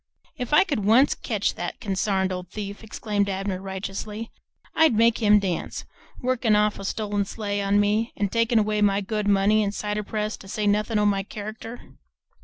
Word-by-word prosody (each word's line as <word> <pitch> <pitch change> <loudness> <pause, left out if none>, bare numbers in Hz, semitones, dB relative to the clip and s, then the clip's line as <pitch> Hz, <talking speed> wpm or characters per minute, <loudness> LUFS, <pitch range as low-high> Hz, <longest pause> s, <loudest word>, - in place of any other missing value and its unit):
"If 250 -1 -5
I 300 +6 +6
could 285 - -2
once 235 +8 +5
ketch 215 -5 -1
that 175 - -5
consarned 190 -1 0
old 180 -1 -5
thief," 205 +1 -6
exclaimed 210 -2 -2
Abner 190 -1 -3
righteously, 195 +3 -5 0.4
"I'd 320 -7 +4
make 230 +1 +4
him 210 -2 +5
dance, 190 -4 -3 0.3
workin' 245 -4 +1
off 210 0 +2
a 195 - -6
stolen 205 0 -1
sleigh 205 0 -3
on 200 +1 +2
me 210 +3 +1
an' 200 -1 0
takin' 230 +2 +2
away 210 -1 +1
my 200 -1 +3
good 210 +1 -2
money 205 +2 +4
an' 200 - -1
cider 210 0 -3
press, 215 +1 -3
to 195 - -13
say 210 +2 -2
nothin' 210 +2 +1
o' 210 - +2
my 200 -1 +2
character!" 215 +4 -9
210 Hz, 185 wpm, -25 LUFS, 200-220 Hz, 0.4 s, I